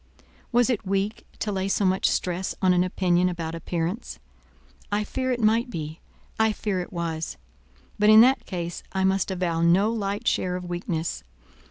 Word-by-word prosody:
Was 245 +1 +3
it 225 - -1
weak 195 +2 -2
to 210 - -2
lay 190 -1 -1
so 195 +1 +1
much 185 0 +2
stress 180 +1 -1
on 185 -2 +4
an 180 0 +3
opinion 180 -1 +2
about 165 -2 -4
appearance? 170 +5 -3 0.7
I 205 +1 +1
fear 260 +4 -2
it 245 - -1
might 230 +3 +2
be; 160 -4 -6 0.4
I 220 -1 +3
fear 205 -3 -2
it 180 - -8
was; 165 -2 -3 0.6
but 210 +1 +5
in 215 0 +9
that 260 +3 +4
case 175 -2 -4
I 190 -1 0
must 190 0 +2
avow 175 -3 -1
no 185 +6 +4
light 205 0 -3
share 180 -1 +1
of 180 0 -5
weakness. 170 - -3
190 Hz, 175 wpm, -25 LUFS, 175-210 Hz, 0.7 s, in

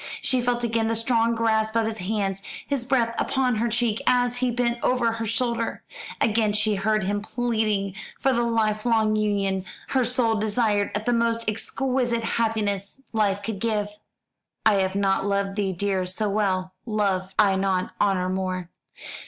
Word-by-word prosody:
She 255 -1 +1
felt 240 0 0
again 225 -1 +1
the 225 - 0
strong 230 0 +2
grasp 220 -1 +1
of 225 -1 +3
his 220 0 -3
hands, 195 0 -1 0.2
his 275 -4 -2
breath 240 -4 +2
upon 255 -4 +1
her 235 +2 +1
cheek, 230 -1 0
as 245 0 +3
he 250 0 +1
bent 240 0 0
over 245 -2 +2
her 225 0 -3
shoulder. 230 +1 -1 0.4
Again 215 -1 +2
she 210 +1 +2
heard 215 +1 +1
him 205 +2 -1
pleading 215 -4 -1 0.3
for 270 - +2
the 240 - +1
life 220 -2 +1
long 220 -2 +2
union 200 -3 0 0.3
her 260 -2 +2
soul 245 -1 +1
desired 215 -1 +1
as 210 - -1
the 245 - +1
most 230 -1 +1
exquisite 240 +2 -1
happiness 215 -2 -1
life 205 -2 +1
could 220 -4 -4
give. 210 -2 0 0.8
"I 215 -2 +5
had 190 0 0
not 195 0 +1
loved 200 -1 0
thee, 200 -2 0
dear, 190 0 -1
so 205 +3 -1
well 185 -3 0
Loved 195 -3 -1
I 200 -2 +4
not 190 -1 0
honour 185 -2 +2
more." 185 -1 -3
220 Hz, 170 wpm, -25 LUFS, 200-235 Hz, 0.8 s, I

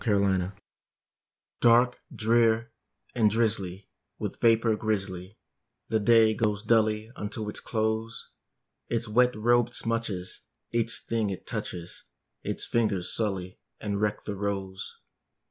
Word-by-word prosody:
A 105 -4 +3
WET 100 -1 +3
DAY 90 +1 -3 1.1
Dark, 120 +1 +5
drear, 115 +1 +2 0.4
and 110 -4 +4
drizzly, 100 -4 0 0.3
with - - -5
vapor 115 -1 +4
grizzly, 100 -2 -2 0.5
The 110 -1 +2
day 110 0 +5
goes 105 -1 0
dully 110 0 +2
unto 105 -1 -4
its - - -5
close; 110 0 -2 0.6
Its 115 0 -1
wet 125 +3 +3
robe 120 +2 +3
smutches 115 -6 -2 0.3
each 115 -1 0
thing 115 -3 0
it 95 - -6
touches, 85 -1 -5 0.4
Its - - -3
fingers 105 -6 0
sully 95 -4 -2 0.2
and 100 -1 -2
wreck 105 -1 0
the 105 - -4
rose. 95 -1 -4
110 Hz, 125 wpm, -28 LUFS, 100-115 Hz, 1.1 s, Dark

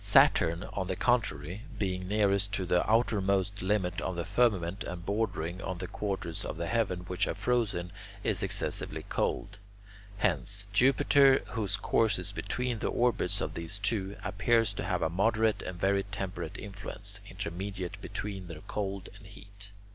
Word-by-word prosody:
Saturn, 85 0 +5
on 95 -2 -2
the 95 - -1
contrary, 100 - 0 0.2
being 95 -2 -2
nearest 100 -1 +2
to 95 -2 -1
the 90 +2 +2
outermost 100 -3 +2
limit 95 -2 0
of 95 - -2
the 85 - -2
firmament 100 -3 +2
and 85 -1 -6
bordering 95 -4 -1
on 95 -2 -3
the 90 - -4
quarters 95 -4 -3
of - - -4
the 85 - -2
heaven 90 -1 0
which 90 +1 -1
are - - -2
frozen, 105 -8 0 0.3
is - - +1
excessively - - -1
cold. - - -1 0.6
Hence, 100 +1 0
Jupiter, 135 +3 +5
whose 100 -4 -1
course 105 +2 +2
is 90 +2 -1
between 115 +4 -2
the - - -1
orbits 115 -5 +1
of 80 - -2
these 85 +5 -4
two, 100 -1 -1
appears 105 +3 +2
to - - -4
have - - 0
a 80 - +2
moderate 110 +4 +2
and 90 -1 -6
very 100 +1 +3
temperate 95 -4 -5
influence, 100 0 -6
intermediate 95 -1 -5
between 95 -3 -5
their 80 -2 -8
cold 100 -2 -3
and 100 -1 -14
heat. 100 0 -12
100 Hz, 160 wpm, -30 LUFS, 90-105 Hz, 0.6 s, Saturn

